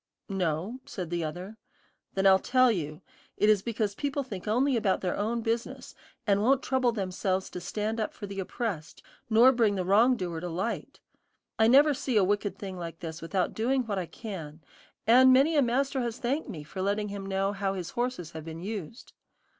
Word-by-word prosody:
"No," 185 +5 -2
said 180 -4 -6
the 170 -1 -1
other. 180 +7 -6 0.6
"Then 195 0 +1
I'll 190 -1 +7
tell 255 +2 +4
you. 155 -4 -4 0.3
It 210 - +3
is 210 -3 +5
because 220 -2 -2
people 280 +4 -2
think 210 -6 -8
only 255 +5 +2
about 205 -4 +1
their 180 -2 -1
own 230 +3 -1
business, 230 +1 -3 0.3
and 200 -1 +3
won't 265 +4 +3
trouble 260 -2 +2
themselves 190 -2 -2
to 180 - -6
stand 215 +4 -3
up 215 - -1
for - - -8
the 200 -1 -6
oppressed, 190 -4 -4 0.3
nor 235 +4 +7
bring 225 -5 +2
the 185 -2 -2
wrong 230 +7 +4
doer 175 -4 -3
to 180 +1 -5
light. 185 +8 -4 0.6
I 220 - +6
never 285 +5 +6
see 255 -3 -1
a 205 - +5
wicked 205 +1 0
thing 190 -2 -6
like 165 -1 -7
this 160 0 -6
without 180 +2 -1
doing 255 +4 +1
what 205 -3 -2
I 175 - -4
can, 160 -9 -8 0.4
and 255 +3 +7
many 275 +5 +5
a 290 - +5
master 265 +2 +1
has 235 -1 -3
thanked 265 +4 -2
me 160 -9 -6
for 185 +5 -7
letting 205 +2 0
him 200 -1 -5
know 195 0 0
how 195 -1 -2
his 175 -2 -5
horses 240 -9 -3
have 160 -1 -7
been 165 +1 -7
used." 210 - -6
205 Hz, 200 wpm, -28 LUFS, 185-240 Hz, 0.6 s, I'll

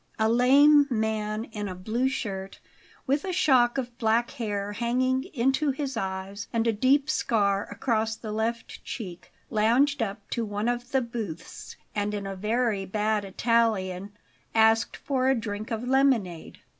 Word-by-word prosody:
A 220 - +2
lame 280 +5 +6
man 220 -2 -1
in 210 -3 -6
a 185 - -5
blue 225 +8 -1
shirt, 195 -7 -5 0.5
with 280 +2 +1
a 380 - -3
shock 255 -7 +3
of 245 -2 -3
black 230 +1 +2
hair 205 -6 -3
hanging 255 +4 0
into 270 -2 0
his 275 0 -3
eyes 190 +1 -4
and 230 0 0
a 230 - +2
deep 270 +6 +3
scar 205 -9 +1
across 225 -3 -1
the 220 -1 -7
left 225 +2 -3
cheek, 185 -8 -7 0.2
lounged 245 +6 +3
up 205 -1 -4
to 235 - -1
one 205 +1 -2
of 245 0 -2
the 265 - +2
booths 225 -9 -7 0.2
and, 205 0 -1
in 195 -1 -4
very 215 0 0
bad 210 +2 0
Italian, 200 -2 0 0.4
asked 225 +1 +3
for 260 -2 0
a 265 - +4
drink 215 -1 -4
of 230 +1 -3
lemonade. 250 -11 +1
225 Hz, 155 wpm, -27 LUFS, 205-255 Hz, 0.5 s, lame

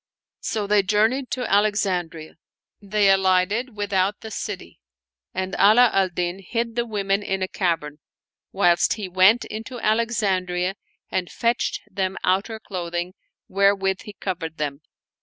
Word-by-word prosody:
• - - -70 0.4
So 215 -2 -1
they 205 0 +4
journeyed 220 +7 +1
to 250 -1 -2
Alexandria. 190 -6 0 0.4
They 200 0 +3
alighted 195 +5 +2
with 205 0 -3
lout 190 +2 +1
the 220 - -8
city 200 -2 -6 0.5
and 190 +1 -3
Ala 225 +4 +6
al 190 -1 +3
Din 175 +1 -3
hid 230 +4 -3
the 240 0 -1
women 200 -2 0
in 195 -1 -2
a - - -1
cavern, 165 -6 -2 0.5
whilst 175 -3 +3
he 210 -3 -5
went 190 +6 +4
into 225 +3 -7
Alexandria 195 -6 0 0.4
and 180 -2 -1
fetched 235 0 0
them 190 -1 -2
outer 195 +4 0
clothing, 175 -3 -4 0.3
wherewith 195 0 +2
he 210 - -8
covered 170 -5 -5
them. 145 -1 -3
195 Hz, 140 wpm, -23 LUFS, 185-215 Hz, 0.5 s, Ala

